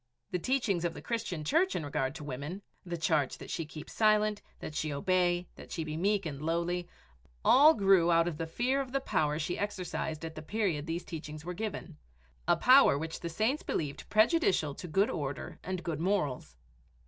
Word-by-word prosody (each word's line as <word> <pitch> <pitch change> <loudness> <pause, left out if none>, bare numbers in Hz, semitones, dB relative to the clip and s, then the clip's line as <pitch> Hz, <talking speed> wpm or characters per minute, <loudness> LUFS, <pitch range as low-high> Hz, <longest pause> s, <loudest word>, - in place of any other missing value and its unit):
The 180 - 0
teachings 225 -6 0
of 170 -1 -1
the - - -8
Christian 215 -9 -3
Church 335 - +2
in 160 - -2
regard 135 -1 -1
to 160 - -7
women, 145 +8 -5 0.2
the 175 -1 -4
charge 155 -4 +1
that - - -9
she 165 - -3
keep 155 0 -9
silent, 215 -1 +2 0.2
that - - -6
she 155 0 -2
obey, 175 +3 +1
that - - -12
she 165 - -2
be 155 -1 -5
meek 200 +3 +1
and 145 -3 -5
lowly 170 +2 -1 0.6
all 300 +4 +7
grew 195 -4 +4
out 165 0 +4
of 165 -4 -3
the 165 - -2
fear 250 +10 0
of 260 -1 -7
the 275 - +2
power 150 - 0
she 165 +3 -2
exercised 175 -5 -3
at 160 - -6
the 155 - -7
period 175 -4 -1
these 165 +2 -3
teachings 155 -2 -7
were 180 - -3
given 185 -5 -5 0.5
a - - +4
power 255 - +6
which 160 +2 -4
the 170 - -4
saints 220 - 0
believed 140 -3 -3
prejudicial 215 - +3
to 180 - -8
good 195 +6 +2
order 145 -4 -4
and 185 0 -4
good 160 -4 -3
morals. 165 - -1
170 Hz, 195 wpm, -31 LUFS, 155-205 Hz, 0.6 s, all